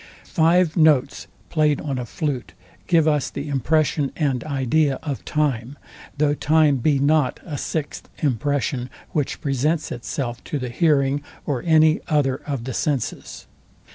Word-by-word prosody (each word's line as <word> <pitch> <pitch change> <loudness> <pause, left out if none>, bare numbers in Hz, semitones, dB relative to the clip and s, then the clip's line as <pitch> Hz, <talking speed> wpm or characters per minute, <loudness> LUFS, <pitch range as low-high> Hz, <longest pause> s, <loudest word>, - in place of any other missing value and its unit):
Five 165 0 +3
notes 145 -4 +3 0.2
played 150 -3 +2
on 140 -3 -3
a 120 - -5
flute 130 - -3 0.3
give 165 -3 +4
us 150 -3 +1
the 140 - -6
impression 145 +1 +1
and 140 -6 0
idea 140 0 +1
of 145 -4 -4
time; 140 -3 -1 0.4
though 145 0 +2
time 150 -1 +3
be 140 +3 +2
not 145 -1 +2
a 155 - -5
sixth 150 +1 -4
impression, 135 -2 0 0.2
which 145 -3 -2
presents 145 +4 0
itself 120 0 -4
to 150 - -3
the 125 -2 -4
hearing 140 -1 +2 0.2
or 135 -5 -1
any 160 0 +5
other 145 -5 +1
of 140 -5 -3
the 130 +1 -5
senses. 140 -4 -3
145 Hz, 140 wpm, -22 LUFS, 135-155 Hz, 0.4 s, any